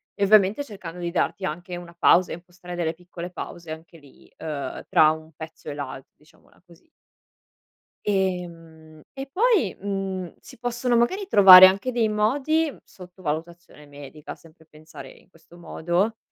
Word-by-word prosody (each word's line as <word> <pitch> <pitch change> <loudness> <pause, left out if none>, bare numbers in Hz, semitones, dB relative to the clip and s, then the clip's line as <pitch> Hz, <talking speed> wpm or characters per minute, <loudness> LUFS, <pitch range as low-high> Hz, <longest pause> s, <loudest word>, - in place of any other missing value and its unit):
e 200 - -2
ovviamente 205 +5 +4
cercando 180 -8 -10
di 170 -1 -4
darti 185 +2 -2
anche 175 +3 -5
una 175 -1 -11
pausa 180 +1 +4
e - - -3
impostare 175 0 -11
delle 165 -2 -2
piccole 175 +1 -10
pause 170 -2 -8
anche 160 +1 -10
lì, 140 -2 -21
uhm, 150 -3 -6
tra 155 -1 +5
un 160 0 -8
pezzo 160 -1 -10
e 145 - -5
l'al 135 -2 -6 0.2
diciamola 150 +3 -26
così. 170 - -22 1.2
Ehm, 165 -5 -4
e 270 0 -6
poi, 420 - +2
mhmm, 195 -3 -4
si - - -16
possono 245 0 -1
magari 370 - +1
trovare 190 - +10
anche 195 +7 +2
dei 235 -2 +1
modi, 280 +9 0
sotto 180 0 -15
valutazione 160 -1 -6
medica, 145 +1 -11
sempre 160 -1 -21
pensare 155 -3 -13
in - - -19
questo 165 -1 -20
modo, 175 +6 -2
175 Hz, 155 wpm, -24 LUFS, 160-200 Hz, 1.2 s, trovare